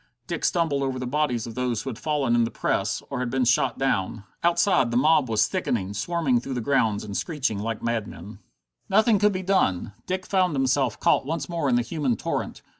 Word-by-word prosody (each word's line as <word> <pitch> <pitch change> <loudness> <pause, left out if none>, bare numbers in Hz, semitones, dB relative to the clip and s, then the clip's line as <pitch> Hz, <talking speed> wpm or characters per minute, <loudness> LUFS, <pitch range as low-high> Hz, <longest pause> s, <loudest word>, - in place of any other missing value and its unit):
Dick - - -4
stumbled 165 -6 +1
over 135 -1 -1
the 125 - -4
bodies 125 -4 0
of 115 - -7
those 125 -3 -2
who 135 - -4
had 110 - -9
fallen 145 -6 0
in 120 0 +4
the 115 - 0
press, 95 -3 -1
or 135 - -2
had 125 -1 -2
been 130 0 +1
shot 120 0 +2
down. 110 -5 -1 0.2
Outside 170 -6 +3
the 120 - 0
mob 150 -1 +3
was 105 -2 +3
thickening, 100 -4 -2
swarming 135 - 0
through 135 +1 -5
the - - -1
grounds 115 -4 +1
and 100 -2 -7
screeching 140 - -2
like 115 +1 -4
madmen. 110 -4 -4 0.5
Nothing 215 +2 +4
that 210 - +2
could 210 - +5
be 185 0 -3
done! 110 - +1
Dick 185 0 -2
found 185 -5 +1
himself 135 -3 +1
caught - - +2
once 155 -1 -2
more 165 -5 -1
in 125 - +3
the 120 - +2
human 140 -3 -1
torrent. - - -4
130 Hz, 215 wpm, -25 LUFS, 115-155 Hz, 0.5 s, could